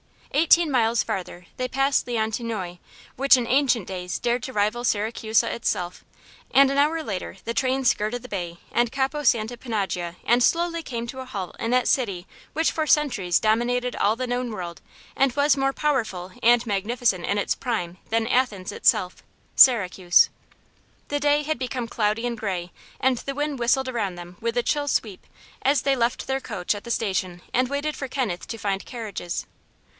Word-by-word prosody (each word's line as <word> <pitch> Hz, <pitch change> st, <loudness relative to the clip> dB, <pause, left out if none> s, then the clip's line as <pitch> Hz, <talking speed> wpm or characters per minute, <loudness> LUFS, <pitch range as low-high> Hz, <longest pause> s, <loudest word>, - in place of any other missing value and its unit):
Eighteen 325 Hz, +1 st, +4 dB
miles 230 Hz, -3 st, +2 dB
farther 180 Hz, -1 st, -5 dB
they 255 Hz, -, -1 dB
passed 270 Hz, +1 st, +1 dB
Leontinoi, 220 Hz, -5 st, -2 dB, 0.4 s
which 275 Hz, 0 st, +6 dB
in 245 Hz, -, -1 dB
ancient 250 Hz, -4 st, +2 dB
days 180 Hz, -1 st, -4 dB
dared 245 Hz, 0 st, 0 dB
to 260 Hz, -, -5 dB
rival 215 Hz, +3 st, 0 dB
Siracusa 220 Hz, 0 st, +1 dB
itself, 180 Hz, -6 st, -2 dB, 0.5 s
and 275 Hz, 0 st, +5 dB
an 275 Hz, -, -1 dB
hour 315 Hz, +3 st, +2 dB
later 195 Hz, -8 st, -5 dB
the 230 Hz, -, -2 dB
train 265 Hz, +1 st, 0 dB
skirted 240 Hz, +1 st, +1 dB
the 250 Hz, -, -10 dB
bay 175 Hz, -4 st, -4 dB
and 240 Hz, -1 st, +1 dB
Capo 275 Hz, +2 st, -1 dB
Santa 235 Hz, -1 st, +2 dB
Panagia 195 Hz, -8 st, -3 dB
and 240 Hz, +1 st, +4 dB
slowly 335 Hz, +4 st, +2 dB
came 235 Hz, -6 st, -5 dB
to 260 Hz, +2 st, -7 dB
a 260 Hz, -, -6 dB
halt 195 Hz, -8 st, -6 dB
in 225 Hz, -, -2 dB
that 250 Hz, 0 st, +3 dB
city 195 Hz, -9 st, 0 dB, 0.3 s
which 320 Hz, +2 st, +2 dB
for 315 Hz, -1 st, -2 dB
centuries 245 Hz, -, +2 dB
dominated 245 Hz, +3 st, +1 dB
all 210 Hz, +2 st, +2 dB
the 255 Hz, +2 st, -3 dB
known 245 Hz, 0 st, -2 dB
world 175 Hz, -5 st, -6 dB, 0.3 s
and 270 Hz, -2 st, +2 dB
was 290 Hz, 0 st, +4 dB
more 270 Hz, 0 st, +1 dB
powerful 220 Hz, -, -1 dB
and 240 Hz, +1 st, +5 dB
magnificent 210 Hz, -2 st, 0 dB
in 200 Hz, -, 0 dB
its 200 Hz, -, +1 dB
prime 185 Hz, -9 st, -3 dB
than 225 Hz, 0 st, +1 dB
Athens 225 Hz, -6 st, 0 dB
itself 180 Hz, -1 st, +2 dB, 0.4 s
Syracuse. 185 Hz, -8 st, +6 dB, 0.8 s
The 290 Hz, -, 0 dB
day 290 Hz, +1 st, +2 dB
had 310 Hz, -3 st, -2 dB
become 250 Hz, -2 st, -3 dB
cloudy 220 Hz, 0 st, 0 dB
and 240 Hz, -1 st, -2 dB
gray 185 Hz, -5 st, -3 dB, 0.3 s
and 260 Hz, -1 st, +2 dB
the 275 Hz, -, -5 dB
wind 290 Hz, -2 st, -2 dB
whistled 260 Hz, +2 st, +2 dB
around 210 Hz, -7 st, -2 dB
them 175 Hz, 0 st, -10 dB
with 230 Hz, +1 st, -2 dB
a 245 Hz, -, +2 dB
chill 290 Hz, +2 st, 0 dB
sweep 210 Hz, -8 st, -2 dB, 0.3 s
as 275 Hz, +2 st, +2 dB
they 275 Hz, -1 st, +3 dB
left 235 Hz, -1 st, 0 dB
their 265 Hz, 0 st, -1 dB
coach 200 Hz, -7 st, -2 dB
at 205 Hz, +2 st, -8 dB
the 235 Hz, -, -4 dB
station 185 Hz, -5 st, -1 dB
and 255 Hz, 0 st, +2 dB
waited 285 Hz, +2 st, -2 dB
for 270 Hz, -, -5 dB
Kenneth 245 Hz, -10 st, -3 dB
to 225 Hz, -, -5 dB
find 200 Hz, -2 st, -2 dB
carriages. 215 Hz, -8 st, -5 dB
235 Hz, 180 wpm, -24 LUFS, 205-265 Hz, 0.8 s, which